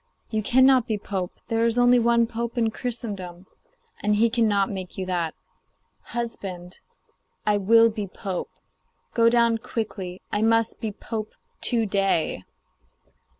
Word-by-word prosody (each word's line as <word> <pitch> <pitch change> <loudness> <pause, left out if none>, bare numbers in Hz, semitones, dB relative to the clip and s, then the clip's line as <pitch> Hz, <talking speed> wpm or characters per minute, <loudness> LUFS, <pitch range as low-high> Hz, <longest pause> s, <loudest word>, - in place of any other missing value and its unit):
You 220 -1 0
cannot 260 +2 +4
be 220 - 0
pope; 190 -3 -4
there 225 0 +1
is 230 0 +1
only 245 0 +5
one 235 0 +3
pope 235 +1 -4
in 225 -2 +2
Christendom, 200 -8 -5 0.6
and 210 0 +2
he 225 +2 +3
cannot 215 -4 +2
make 190 -2 -6
you 190 - -2
that.' 175 -3 -2 0.7
'Husband,' 195 -7 -5
she - - -13
said, - - -44
'I 210 -1 +3
will 225 +3 +5
be 210 -2 -4
pope. 190 -1 -5 0.6
Go 230 -1 +5
down 235 -1 +3
quickly; 205 -6 -5
I 205 - 0
must 225 0 +2
be 220 - -2
pope 215 +1 -6 0.3
to 230 -3 +2
day. 195 - 0
220 Hz, 150 wpm, -25 LUFS, 195-235 Hz, 0.7 s, only